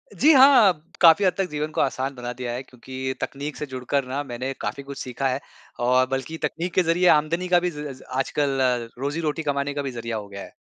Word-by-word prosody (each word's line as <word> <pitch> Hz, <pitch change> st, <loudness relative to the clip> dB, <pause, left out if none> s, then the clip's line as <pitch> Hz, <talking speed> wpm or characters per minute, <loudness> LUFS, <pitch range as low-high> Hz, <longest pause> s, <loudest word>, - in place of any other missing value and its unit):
जी, 310 Hz, +3 st, +5 dB
हाँ। 240 Hz, -, +6 dB, 0.2 s
काफ़ी 165 Hz, +3 st, +7 dB
हद 185 Hz, -, +3 dB
तक 190 Hz, -2 st, -1 dB
जीवन 150 Hz, +1 st, -3 dB
को -, -, 0 dB
आसान 135 Hz, 0 st, -1 dB
बना 120 Hz, -1 st, -5 dB
दिया 125 Hz, -1 st, -5 dB
है 125 Hz, -, -4 dB
क्योंकि 130 Hz, +1 st, -6 dB
तकनीक 145 Hz, +2 st, -4 dB
से -, -, -4 dB
जुड़कर 130 Hz, 0 st, -2 dB
ना 135 Hz, +3 st, -2 dB
मैंने 130 Hz, +1 st, -4 dB
काफ़ी 140 Hz, -1 st, -4 dB
कुछ 140 Hz, 0 st, -9 dB
सीखा 130 Hz, +2 st, -2 dB
है। 130 Hz, +1 st, -1 dB, 0.5 s
और 130 Hz, 0 st, +4 dB
बल्कि 135 Hz, +5 st, -3 dB
तकनीक 175 Hz, +2 st, -2 dB
के 185 Hz, -, +3 dB
ज़रिए 175 Hz, +2 st, +2 dB
आमदनी 165 Hz, +4 st, +3 dB
का 175 Hz, -1 st, +4 dB
भी 180 Hz, 0 st, -1 dB
ज़ 150 Hz, -3 st, -7 dB
आजकल 135 Hz, +1 st, -1 dB, 0.4 s
रोज़ी-रोटी 150 Hz, +3 st, -2 dB
कमाने 140 Hz, 0 st, -1 dB
का 145 Hz, -, -2 dB
भी 135 Hz, -, -4 dB
ज़रिया 115 Hz, -2 st, -4 dB
हो 105 Hz, -1 st, -7 dB
गया 100 Hz, 0 st, -9 dB
है। -, -, -11 dB
140 Hz, 220 wpm, -24 LUFS, 130-160 Hz, 0.5 s, काफ़ी